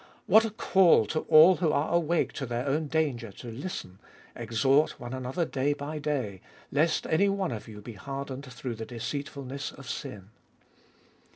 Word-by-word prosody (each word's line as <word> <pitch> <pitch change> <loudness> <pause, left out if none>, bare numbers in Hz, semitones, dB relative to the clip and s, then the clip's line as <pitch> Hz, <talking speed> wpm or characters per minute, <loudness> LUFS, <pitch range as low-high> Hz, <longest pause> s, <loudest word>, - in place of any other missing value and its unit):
What 220 +2 +6
a - - -1
call 190 - +4
to 155 +9 -1
all 165 +3 +8
who 165 -4 +1
are 150 +3 0
awake 170 0 +1
to 135 - -4
their 120 +2 -2
own 150 +3 0
danger 140 -8 -1
to 120 +3 -9
listen, 115 - -6 0.2
" - - -25
Exhort 120 +6 +2
one 120 +1 -7
another 130 +6 -2
day 145 -1 0
by 145 +2 -5
day, 130 -11 -2 0.3
lest 155 +4 +2
any 200 +6 +3
one 195 -4 -1
of 110 -3 -6
you 105 -2 -10
be 120 - -8
hardened 135 +3 -6
through 125 0 -5
the 110 0 -6
deceitfulness 135 +3 -5
of 135 -1 -12
sin." 105 -8 -6
140 Hz, 175 wpm, -28 LUFS, 120-155 Hz, 0.3 s, all